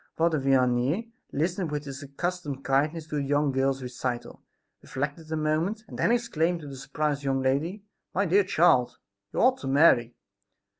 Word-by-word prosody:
Father 160 Hz, -2 st, +2 dB
Vianney 135 Hz, -, +1 dB, 0.2 s
listened 175 Hz, +4 st, -1 dB
with 150 Hz, 0 st, -3 dB
his 140 Hz, 0 st, -7 dB
accustomed 145 Hz, -1 st, -4 dB
kindness 150 Hz, +5 st, +1 dB
to 150 Hz, -1 st, -4 dB
the -, -, 0 dB
young 145 Hz, +1 st, +1 dB
girl's 135 Hz, 0 st, 0 dB
recital, 125 Hz, -1 st, -4 dB, 0.4 s
reflected 145 Hz, +4 st, -5 dB
a 160 Hz, -, 0 dB
moment 160 Hz, +8 st, 0 dB
and -, -, -9 dB
then -, -, +3 dB
exclaimed 175 Hz, -8 st, 0 dB
to 150 Hz, -, -9 dB
the 140 Hz, -, -8 dB
surprised 145 Hz, +2 st, -2 dB
young 135 Hz, -1 st, +1 dB
lady: 160 Hz, +10 st, 0 dB, 0.3 s
"My 200 Hz, +3 st, +1 dB
dear 195 Hz, +3 st, +4 dB
child, 165 Hz, -9 st, +3 dB, 0.3 s
you -, -, -3 dB
ought 255 Hz, +2 st, +4 dB
to -, -, -6 dB
marry!" 135 Hz, -4 st, +4 dB
150 Hz, 165 wpm, -27 LUFS, 135-170 Hz, 0.4 s, dear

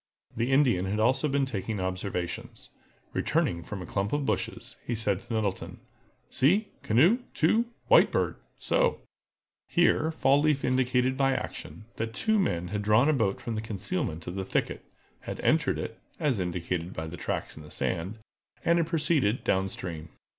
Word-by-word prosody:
The 120 Hz, +3 st, 0 dB
Indian 130 Hz, -10 st, +3 dB
had 100 Hz, +3 st, -1 dB
also 130 Hz, +7 st, +3 dB
been 140 Hz, -1 st, +1 dB
taking 105 Hz, -4 st, -3 dB
observations. 90 Hz, -1 st, -4 dB, 0.4 s
Returning 85 Hz, -1 st, 0 dB
from 95 Hz, +2 st, -6 dB
a -, -, -7 dB
clump 100 Hz, +3 st, -2 dB
of 145 Hz, -1 st, 0 dB
bushes, -, -, -3 dB
he 120 Hz, -, -2 dB
said 105 Hz, -4 st, 0 dB
to -, -, -13 dB
Nettleton: 105 Hz, -4 st, -2 dB, 0.5 s
"See—canoe—two—White 205 Hz, -, +3 dB
Bird—so!" -, -, 0 dB, 0.7 s
Here 170 Hz, -2 st, +3 dB
Fall 145 Hz, -3 st, +3 dB
leaf 150 Hz, -2 st, +2 dB
indicated 130 Hz, 0 st, +2 dB
by 135 Hz, -1 st, +3 dB
action, 105 Hz, -, -6 dB
that 115 Hz, 0 st, -3 dB
two 220 Hz, -1 st, +2 dB
men 90 Hz, -, 0 dB
had 105 Hz, 0 st, -2 dB
drawn 110 Hz, +7 st, +4 dB
a -, -, +4 dB
boat 110 Hz, -8 st, +1 dB
from 115 Hz, -, -4 dB
concealment 95 Hz, -7 st, -3 dB
in 85 Hz, -, -3 dB
the 95 Hz, -, -2 dB
thicket, 95 Hz, -, -2 dB, 0.4 s
had -, -, -7 dB
entered -, -, +2 dB
it, -, -, -5 dB, 0.2 s
as 135 Hz, -8 st, +1 dB
indicated 90 Hz, 0 st, -2 dB
by 80 Hz, -, -4 dB
tracks 85 Hz, -1 st, -4 dB
in 80 Hz, -, -10 dB
the 75 Hz, -, -12 dB
sand, 95 Hz, +9 st, -2 dB, 0.5 s
and 170 Hz, +1 st, +4 dB
had 165 Hz, -, +1 dB
proceeded 150 Hz, -, +1 dB
down 95 Hz, 0 st, +1 dB
stream. 85 Hz, -4 st, -6 dB
110 Hz, 155 wpm, -28 LUFS, 95-145 Hz, 0.7 s, drawn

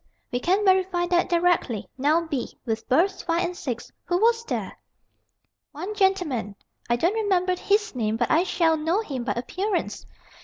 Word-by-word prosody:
we 245 Hz, -, 0 dB
can 380 Hz, +9 st, +1 dB
verify 375 Hz, -2 st, +3 dB
that 350 Hz, +1 st, +1 dB
directly. 345 Hz, -, +1 dB
Now, 305 Hz, +5 st, +2 dB
b, 285 Hz, -7 st, -4 dB
with 225 Hz, -1 st, -3 dB
berths 350 Hz, +9 st, +2 dB
5 340 Hz, +1 st, 0 dB
and 355 Hz, +1 st, -4 dB
6. 245 Hz, -8 st, -5 dB
Who 350 Hz, -, +1 dB
was 460 Hz, +3 st, +3 dB
there?" -, -, -3 dB, 1.0 s
"One 360 Hz, +8 st, -5 dB
gentleman. 360 Hz, -, 0 dB, 0.3 s
I 240 Hz, -, +4 dB
don't 340 Hz, -, +1 dB
remember 375 Hz, -4 st, +1 dB
his 415 Hz, +3 st, +1 dB
name. 220 Hz, -3 st, -1 dB
But 240 Hz, 0 st, 0 dB
I 320 Hz, -, +5 dB
shall 330 Hz, -3 st, +2 dB
know 325 Hz, +7 st, +1 dB
him 270 Hz, -, -4 dB
by 205 Hz, -, 0 dB
appearance." 365 Hz, -, -3 dB
345 Hz, 165 wpm, -25 LUFS, 260-380 Hz, 1.0 s, I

